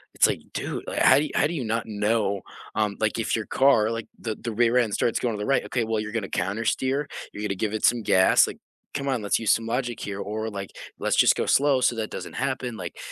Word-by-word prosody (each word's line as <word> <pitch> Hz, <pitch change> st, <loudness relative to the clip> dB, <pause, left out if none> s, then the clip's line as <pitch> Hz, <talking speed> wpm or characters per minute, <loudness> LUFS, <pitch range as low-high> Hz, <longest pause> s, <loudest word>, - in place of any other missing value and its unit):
it's, -, -, +5 dB
like, -, -, -2 dB
"Dude," -, -, -4 dB
like -, -, -2 dB
"how -, -, +7 dB
you 150 Hz, +2 st, +2 dB
how -, -, +3 dB
do 165 Hz, -, -4 dB
you 140 Hz, -, -2 dB
not 115 Hz, 0 st, -1 dB
know 105 Hz, -2 st, 0 dB, 0.3 s
"um, 105 Hz, -1 st, 0 dB
like, 110 Hz, 0 st, 0 dB
if 115 Hz, -, 0 dB
your 110 Hz, -2 st, -3 dB
car 130 Hz, -6 st, +4 dB
like, 115 Hz, -1 st, -4 dB
the 110 Hz, -2 st, -3 dB
the 115 Hz, -, -5 dB
rear 120 Hz, +2 st, +2 dB
end 115 Hz, -4 st, +2 dB
starts 115 Hz, -, +1 dB
going 120 Hz, -2 st, -1 dB
to -, -, -6 dB
the 105 Hz, -, -3 dB
right 135 Hz, -, +2 dB
""Okay, 120 Hz, -, -1 dB
well, 110 Hz, -1 st, -1 dB
you're 105 Hz, 0 st, -4 dB
gonna 110 Hz, -3 st, -2 dB
countersteer, 115 Hz, +9 st, -1 dB, 0.3 s
you're 105 Hz, -, -7 dB
gonna 100 Hz, -2 st, -1 dB
give 105 Hz, +2 st, -2 dB
it 110 Hz, -, +1 dB
some 120 Hz, -1 st, +3 dB
gas," 95 Hz, -2 st, +5 dB
like -, -, -7 dB, 0.4 s
"come 140 Hz, 0 st, -3 dB
on, 130 Hz, -4 st, 0 dB
let's 100 Hz, -, +1 dB
use 110 Hz, -2 st, +2 dB
some 115 Hz, -, +2 dB
logic 120 Hz, 0 st, -2 dB
here, 100 Hz, -1 st, -5 dB
or," 110 Hz, +2 st, -3 dB
like, 100 Hz, -2 st, -6 dB, 0.3 s
"let's -, -, +1 dB
just -, -, +5 dB
go -, -, -1 dB
slow 140 Hz, -1 st, +3 dB
so 120 Hz, -, +2 dB
that 110 Hz, -1 st, -3 dB
doesn't -, -, -7 dB
happen," 130 Hz, -2 st, -2 dB
like, 90 Hz, -4 st, -7 dB
115 Hz, 255 wpm, -25 LUFS, 105-125 Hz, 0.4 s, how